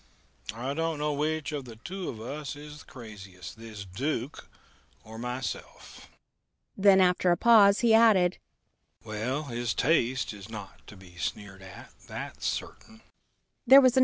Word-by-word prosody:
I 130 +4 -3
don't 165 +1 -1
know 150 0 -1
which 155 +1 -1
of 140 -4 -5
us 115 -2 -10
two 175 - -6 0.3
is 150 0 -10
the - - -14
craziest 100 -5 -11
this 110 -3 -9
Duke 125 +7 -4 0.6
or 110 +1 -10
myself." 125 -1 -6 0.7
Then, 195 -1 +6
after 180 0 +3
a 175 - +3
pause, 205 -2 +6
he 235 -2 +4
added, 210 -6 +5 0.6
"Well, 115 +7 -3
his 120 -4 -3
taste 130 -5 +1
is 100 0 -11
not 105 -3 -10
to 105 - -12
be 90 -2 -16
sneered 100 -1 -5
at; 95 -1 -12
that's - - -5
certain." 225 0 -6
130 Hz, 135 wpm, -28 LUFS, 110-170 Hz, 0.7 s, Then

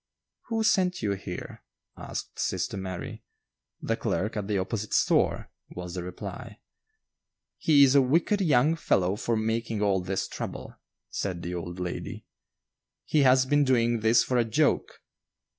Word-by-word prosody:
"Who 225 -1 0
sent 185 - +2
you 105 - +1
here?" 95 -2 -6 0.3
asked - - -7
sister - - -1
Mary. 95 -2 -6 0.6
"The - - 0
clerk 105 +4 -2
at 105 -2 -3
the 105 -2 0
opposite 100 +3 -2
store," - - +2 0.2
was 90 -1 -7
the 90 - -3
reply. 90 0 -8 1.0
"He 145 -3 +5
is 135 -1 +5
a 140 - +6
wicked 165 +10 +2
young 150 -2 +3
fellow 95 - +1
for 115 +2 -1
making 110 -1 -1
all 95 -2 +2
this 95 +1 -2
trouble," - - -7 0.4
said 90 -3 -3
the 90 0 -4
old 90 +1 -5
lady; 90 -1 -5 0.8
"he 155 - +1
has 130 -1 +5
been 145 +2 +3
doing 120 -3 +2
this 110 +2 +4
for 125 -1 0
a - - +4
joke." 140 +7 0
110 Hz, 150 wpm, -27 LUFS, 95-140 Hz, 1.0 s, a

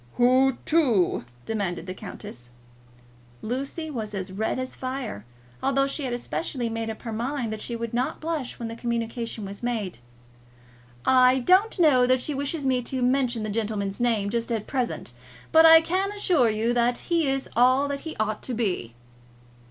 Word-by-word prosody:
"Who 255 +1 +4
to?" 245 - +2 0.2
demanded 190 -6 -2
the 185 - -5
countess. 185 - -10 0.9
Lucy 275 +7 -4
was 215 -6 -5
as 190 -1 -4
red 215 +6 -1
as 255 0 -4
fire, 255 - -5 0.4
although 275 0 +2
she 275 +1 -3
had 250 - -2
especially 245 0 -3
made 225 0 -3
up 220 - -7
her 230 -2 -4
mind 240 0 -2
that 215 - -6
she 235 - -3
would 230 0 -5
not 245 +2 -1
blush 315 -5 -3
when 235 - -5
the 225 - -6
communication 230 -2 -3
was 200 +1 -8
made. 220 - -3 1.1
"I 255 0 +5
don't 375 - +3
know 275 -8 +5
that 255 0 +4
she 295 +4 -1
wishes 285 +2 -2
me 255 -1 +2
to 255 +1 -2
mention 250 -3 +1
the 215 - -3
gentleman's 205 -2 -2
name, 225 -4 +1
just 235 +1 -2
at 220 -3 -1
present; 250 - -2 0.4
but 320 0 +8
I 325 0 +9
can 375 +4 -1
assure 350 - +3
you 220 +2 0
that 240 0 +2
he 335 -4 0
is 270 0 -1
all 255 +4 +4
that 280 0 -3
he 320 +1 -7
ought 215 0 -1
to 250 - -4
be." 180 - -2
245 Hz, 175 wpm, -25 LUFS, 220-270 Hz, 1.1 s, I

